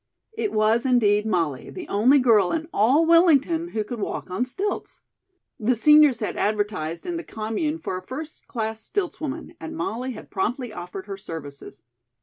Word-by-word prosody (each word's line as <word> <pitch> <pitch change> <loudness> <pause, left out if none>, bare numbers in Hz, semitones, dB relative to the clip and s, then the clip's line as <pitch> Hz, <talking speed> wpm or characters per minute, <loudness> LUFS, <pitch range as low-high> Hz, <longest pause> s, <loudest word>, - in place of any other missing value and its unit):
It 430 - -2
was 215 +2 +2
indeed 220 -5 +3
Molly, 165 -10 -1
the 365 - -8
only 240 +8 +4
girl 225 -8 +4
in 320 -1 -2
all 265 +10 +4
Wellington 335 -1 +4
who 220 -10 -2
could 235 +2 -6
walk 195 - -4
on 225 +7 0
stilts. 385 +11 -4 0.6
The 240 +3 +2
seniors 300 -1 +6
had 210 - -3
advertised 205 -6 -1
in 350 -1 -3
The 335 - -5
Commune 225 +9 -3
for 185 - -4
a - - -6
first 300 +9 -8
class 220 -2 -3
"stiltswoman," 330 -4 -4
and 320 0 -7
Molly 260 -8 -3
had 215 - -11
promptly 235 +4 -2
offered 180 +1 -7
her 200 -2 -6
services. 145 - -9
235 Hz, 165 wpm, -24 LUFS, 205-310 Hz, 0.6 s, seniors